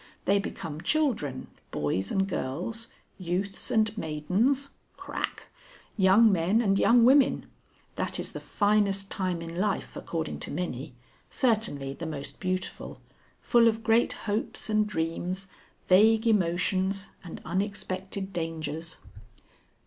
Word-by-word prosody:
They 200 Hz, +1 st, +4 dB
become 155 Hz, -5 st, -5 dB
children, 210 Hz, -, 0 dB, 0.2 s
boys 75 Hz, +6 st, -1 dB
and 195 Hz, 0 st, +1 dB
girls, 195 Hz, -, -3 dB, 0.3 s
youths 185 Hz, +2 st, -3 dB
and 220 Hz, -1 st, +2 dB
maidens 210 Hz, -, 0 dB, 0.3 s
(Crack), -, -, -4 dB, 0.5 s
young 205 Hz, +3 st, +6 dB
men 185 Hz, +4 st, +2 dB
and 195 Hz, -4 st, +2 dB
young 235 Hz, 0 st, +6 dB
women. 265 Hz, +1 st, +5 dB, 0.5 s
That -, -, -1 dB
is -, -, -3 dB
the -, -, -6 dB
finest 205 Hz, -2 st, +1 dB
time 180 Hz, -3 st, -1 dB
in 165 Hz, +1 st, -7 dB
life, 205 Hz, 0 st, -1 dB
according 160 Hz, -2 st, -4 dB
to -, -, -5 dB
many 140 Hz, -7 st, -4 dB, 0.3 s
certainly 210 Hz, -, 0 dB
the 165 Hz, +3 st, -6 dB
most 145 Hz, -3 st, -6 dB
beautiful. 185 Hz, 0 st, -3 dB, 0.4 s
Full 235 Hz, -1 st, +5 dB
of 225 Hz, 0 st, +1 dB
great 225 Hz, +1 st, +3 dB
hopes 215 Hz, +1 st, -2 dB
and 215 Hz, 0 st, +3 dB
dreams, 180 Hz, +1 st, -2 dB, 0.4 s
vague 220 Hz, +4 st, +5 dB
emotions 190 Hz, -1 st, +1 dB
and 175 Hz, -, -8 dB
unexpected 190 Hz, 0 st, -3 dB
dangers." 160 Hz, -1 st, -3 dB
190 Hz, 120 wpm, -28 LUFS, 165-215 Hz, 0.5 s, young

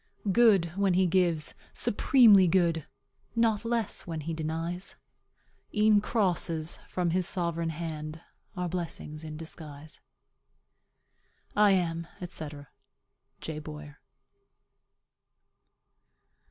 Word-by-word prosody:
"Good 195 Hz, -7 st, +4 dB
when 195 Hz, -2 st, +2 dB
he 185 Hz, +1 st, +4 dB
gives, 170 Hz, -3 st, +1 dB, 0.2 s
supremely 205 Hz, -5 st, +5 dB
good; 170 Hz, -3 st, +2 dB, 0.5 s
Not 225 Hz, -2 st, +2 dB
less 230 Hz, -5 st, -2 dB
when 165 Hz, -2 st, -4 dB
he 165 Hz, +3 st, -4 dB
denies; 165 Hz, +4 st, -3 dB, 0.8 s
E'en 210 Hz, -1 st, +5 dB
crosses 175 Hz, -7 st, 0 dB
from 175 Hz, -2 st, 0 dB
his 180 Hz, +1 st, +1 dB
sovereign 170 Hz, -3 st, -1 dB
hand 155 Hz, -1 st, -5 dB, 0.4 s
Are 180 Hz, 0 st, -1 dB
blessings 165 Hz, -3 st, -5 dB
in 155 Hz, -1 st, -7 dB
disguise." 155 Hz, -1 st, -9 dB, 1.6 s
I 205 Hz, -1 st, +6 dB
am, 170 Hz, -2 st, 0 dB, 0.2 s
&c., 160 Hz, -2 st, -6 dB, 0.9 s
J. 155 Hz, -1 st, -5 dB
BOYER. 150 Hz, -1 st, -9 dB
170 Hz, 95 wpm, -29 LUFS, 160-195 Hz, 1.6 s, I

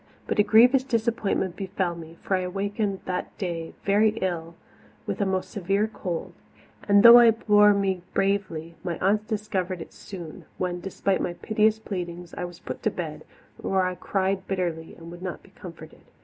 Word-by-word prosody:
But -, -, -2 dB
a -, -, +7 dB
grievous 240 Hz, +5 st, +6 dB
disappointment 225 Hz, -7 st, -1 dB
befell 190 Hz, -2 st, -2 dB
me, 165 Hz, 0 st, -11 dB
for 195 Hz, -, +1 dB
I -, -, +1 dB
awakened 200 Hz, +2 st, -2 dB
that 180 Hz, -1 st, -4 dB
day 170 Hz, -4 st, -4 dB
very 210 Hz, +2 st, +3 dB
ill 170 Hz, -3 st, -3 dB, 0.5 s
with -, -, -3 dB
a 200 Hz, -, +2 dB
most 190 Hz, -1 st, -2 dB
severe 200 Hz, +2 st, 0 dB
cold; 180 Hz, -6 st, -5 dB, 0.5 s
and 200 Hz, 0 st, +6 dB
though 235 Hz, +1 st, +11 dB
I 235 Hz, -1 st, +7 dB
bore 210 Hz, -2 st, +5 dB
me 190 Hz, -2 st, 0 dB
bravely, 195 Hz, -5 st, -1 dB
my 175 Hz, -3 st, -3 dB
aunts 210 Hz, +3 st, +1 dB
discovered 200 Hz, -4 st, -2 dB
it 165 Hz, -, -9 dB
soon, 175 Hz, -5 st, -9 dB
when, 180 Hz, -1 st, -2 dB
despite 195 Hz, +1 st, -1 dB
my 175 Hz, -, -2 dB
piteous 215 Hz, +3 st, +1 dB
pleadings, 180 Hz, -5 st, -6 dB
I -, -, -4 dB
was 175 Hz, -1 st, -9 dB
put -, -, -7 dB
to -, -, +1 dB
bed, -, -, -6 dB, 0.3 s
where 190 Hz, -1 st, 0 dB
I 185 Hz, 0 st, 0 dB
cried 190 Hz, +1 st, -1 dB
bitterly 170 Hz, -4 st, -3 dB
and 165 Hz, 0 st, -11 dB
would 175 Hz, 0 st, -10 dB
not 185 Hz, -1 st, -6 dB
be -, -, -19 dB
comforted. 165 Hz, -4 st, -12 dB
190 Hz, 175 wpm, -25 LUFS, 175-210 Hz, 0.5 s, though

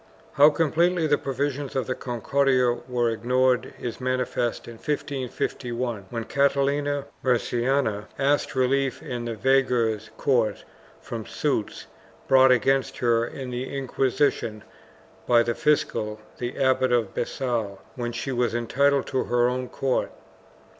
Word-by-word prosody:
2 140 Hz, -, -2 dB
How 150 Hz, -, +10 dB
completely 165 Hz, +3 st, +2 dB
the 145 Hz, -1 st, +2 dB
provisions 140 Hz, +1 st, -3 dB
of 130 Hz, -, 0 dB
the 130 Hz, -, -1 dB
Concordia 125 Hz, +1 st, +1 dB, 0.2 s
were 120 Hz, -2 st, +1 dB
ignored 125 Hz, +2 st, +1 dB
is 120 Hz, +1 st, -5 dB
manifest 125 Hz, -2 st, -1 dB
in 115 Hz, -1 st, -9 dB
1551, 125 Hz, -5 st, -3 dB
when 115 Hz, -1 st, -3 dB
Catalina 140 Hz, +2 st, +1 dB, 0.2 s
Murciana 120 Hz, -3 st, 0 dB
asked 140 Hz, +1 st, +1 dB
relief 130 Hz, +1 st, +1 dB
in 120 Hz, -2 st, -4 dB
the 115 Hz, -1 st, -3 dB
veguer's 120 Hz, -4 st, +1 dB
court 120 Hz, -7 st, +1 dB, 0.4 s
from -, -, -7 dB
suits -, -, -2 dB, 0.4 s
brought 130 Hz, 0 st, +6 dB
against 135 Hz, +2 st, +2 dB
her 115 Hz, -1 st, +2 dB
in 130 Hz, -1 st, -7 dB
the 130 Hz, +3 st, -4 dB
Inquisition 130 Hz, -4 st, 0 dB, 0.6 s
by 120 Hz, -1 st, +5 dB
the 120 Hz, 0 st, -1 dB
fiscal, 110 Hz, -7 st, 0 dB, 0.2 s
the 120 Hz, 0 st, -4 dB
Abbot 130 Hz, -1 st, +2 dB
of 115 Hz, -5 st, +1 dB
Besalu, 120 Hz, -5 st, -2 dB, 0.2 s
when 120 Hz, -2 st, -3 dB
she 120 Hz, +3 st, -4 dB
was 120 Hz, -2 st, 0 dB
entitled 140 Hz, +4 st, +2 dB
to 130 Hz, -, -1 dB
her 120 Hz, 0 st, +2 dB
own 125 Hz, 0 st, -2 dB
court. 135 Hz, -2 st, -1 dB
125 Hz, 135 wpm, -25 LUFS, 120-135 Hz, 0.6 s, How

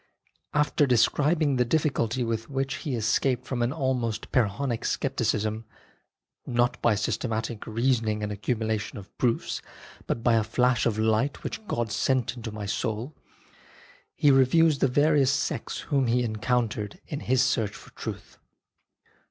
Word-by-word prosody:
After 150 Hz, -1 st, +3 dB
describing 145 Hz, +4 st, +3 dB
the 125 Hz, -, +4 dB
difficulty 125 Hz, -3 st, 0 dB
with 115 Hz, +1 st, -3 dB
which 135 Hz, -1 st, -2 dB
he 145 Hz, -6 st, -3 dB
escaped 120 Hz, +3 st, +1 dB
from 130 Hz, -2 st, -3 dB
an 120 Hz, +1 st, +1 dB
almost 130 Hz, -6 st, -2 dB
Pyrrhonic 120 Hz, +1 st, 0 dB
scepticism, 110 Hz, +1 st, -1 dB, 0.4 s
" -, -, -63 dB
not 120 Hz, 0 st, +1 dB
by 115 Hz, -3 st, +3 dB
systematic 110 Hz, +1 st, -2 dB
reasoning 115 Hz, -2 st, 0 dB
and 105 Hz, -, -2 dB
accumulation 110 Hz, +1 st, -2 dB
of 100 Hz, -1 st, -12 dB
proofs, 70 Hz, -, 0 dB, 0.5 s
but 115 Hz, -, -2 dB
by 120 Hz, -, +4 dB
a 110 Hz, -1 st, +3 dB
flash 120 Hz, +2 st, +2 dB
of 110 Hz, -2 st, -1 dB
light 110 Hz, +5 st, +1 dB
which 220 Hz, -, -6 dB
God 115 Hz, -2 st, -1 dB
sent 130 Hz, +1 st, 0 dB
into 115 Hz, -2 st, -6 dB
my 105 Hz, -1 st, -6 dB
soul," 110 Hz, +7 st, -3 dB, 1.0 s
he 145 Hz, -, +4 dB
reviews 140 Hz, +3 st, +4 dB
the -, -, +4 dB
various 145 Hz, +1 st, +3 dB
sects 135 Hz, -, -2 dB
whom 135 Hz, -3 st, 0 dB
he 125 Hz, +1 st, +2 dB
encountered 110 Hz, -2 st, -1 dB
in 145 Hz, -, -5 dB
his 130 Hz, -1 st, +2 dB
search 115 Hz, -5 st, 0 dB
for -, -, -13 dB
truth. -, -, -8 dB
120 Hz, 145 wpm, -27 LUFS, 110-135 Hz, 1.0 s, the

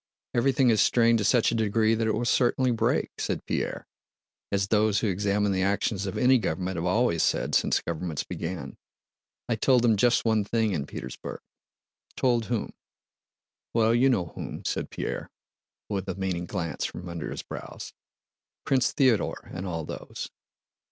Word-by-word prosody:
Everything 130 Hz, 0 st, +3 dB
is 110 Hz, -2 st, +3 dB
strained 115 Hz, -1 st, +4 dB
to -, -, 0 dB
such 120 Hz, +2 st, +3 dB
a -, -, -1 dB
degree 110 Hz, 0 st, +2 dB
that 115 Hz, 0 st, 0 dB
it 110 Hz, -, +2 dB
will 120 Hz, +2 st, -1 dB
certainly 125 Hz, +1 st, +2 dB
break," 115 Hz, -, +1 dB
said -, -, -2 dB
Pierre -, -, -2 dB, 0.7 s
(as 100 Hz, 0 st, 0 dB
those 105 Hz, -1 st, +3 dB
who 115 Hz, -, +1 dB
examine 100 Hz, +1 st, +1 dB
the 95 Hz, -1 st, 0 dB
actions 100 Hz, +1 st, 0 dB
of 95 Hz, -, -4 dB
any 130 Hz, 0 st, +5 dB
government 95 Hz, -1 st, -2 dB
have 85 Hz, -, -2 dB
always 90 Hz, -4 st, +2 dB
said -, -, +1 dB
since -, -, +3 dB
governments 85 Hz, -2 st, -3 dB
began). 80 Hz, -6 st, -5 dB, 0.7 s
"I 120 Hz, -, +1 dB
told 125 Hz, +2 st, +3 dB
them 115 Hz, -3 st, +4 dB
just 120 Hz, +4 st, +3 dB
one 110 Hz, -2 st, +3 dB
thing 110 Hz, +1 st, 0 dB
in 75 Hz, -4 st, -2 dB
Petersburg." -, -, -7 dB, 0.8 s
"Told 120 Hz, -3 st, +2 dB
whom?" 115 Hz, -2 st, -2 dB, 1.0 s
"Well, 115 Hz, 0 st, +4 dB
you 125 Hz, +3 st, +4 dB
know 90 Hz, -10 st, 0 dB
whom," -, -, -7 dB
said -, -, -2 dB
Pierre, -, -, -4 dB, 0.6 s
with 100 Hz, -2 st, -3 dB
a 95 Hz, -, -2 dB
meaning 90 Hz, -3 st, -2 dB
glance 85 Hz, -7 st, -3 dB
from 90 Hz, -, -5 dB
under 85 Hz, -1 st, -5 dB
his -, -, -5 dB
brows. -, -, -8 dB, 0.7 s
"Prince 130 Hz, -2 st, +2 dB
Theodore 130 Hz, -6 st, +1 dB
and 95 Hz, +2 st, -4 dB
all 80 Hz, -2 st, -3 dB
those. -, -, -7 dB
105 Hz, 165 wpm, -27 LUFS, 95-120 Hz, 1.0 s, any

